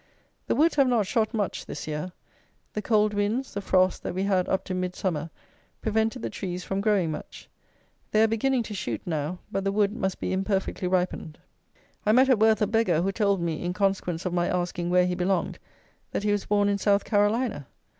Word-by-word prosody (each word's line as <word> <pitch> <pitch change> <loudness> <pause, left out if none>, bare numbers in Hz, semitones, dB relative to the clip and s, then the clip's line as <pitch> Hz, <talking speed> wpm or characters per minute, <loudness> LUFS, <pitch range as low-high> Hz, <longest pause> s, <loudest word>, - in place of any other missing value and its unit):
The - - +1
woods 320 +1 +3
have 275 -2 +5
not 235 -5 +2
shot 215 +2 0
much 210 -4 -2
this - - -6
year. 150 +4 -4 0.6
The 210 - -2
cold 210 -1 +2
winds, 210 +6 -1
the 200 - -3
frosts, 185 -1 +2
that 175 - -5
we 190 - 0
had 190 -2 +1
up 190 - 0
to 190 - -5
Midsummer, 180 -3 -2 0.5
prevented 220 +2 0
the - - -2
trees 180 -2 -4
from 195 0 -2
growing 200 -6 +2
much. - - -8 0.6
They 215 +1 +4
are - - +5
beginning 240 +3 +1
to 215 - -7
shoot 190 -1 -3
now; 160 0 -2
but 195 - -1
the 195 - +1
wood 205 0 +2
must 190 -3 -2
be - - -2
imperfectly 190 -1 -1
ripened. 180 -4 -1 0.7
I 215 - +3
met 260 +3 +5
at 250 -5 +4
Worth 220 0 +4
a - - +4
beggar, 205 -6 +2
who 195 - +1
told 200 -2 +1
me, 165 -1 -2
in 175 0 -1
consequence 190 -3 -1
of 180 - -1
my 175 -1 +1
asking 175 -1 -1
where 180 0 +4
he 180 - 0
belonged, 180 0 -1 0.5
that - - -1
he 210 - +2
was 205 -1 -1
born 205 -1 +3
in 200 0 +1
South 200 0 +2
Carolina. 205 - +1
195 Hz, 205 wpm, -26 LUFS, 180-215 Hz, 0.7 s, have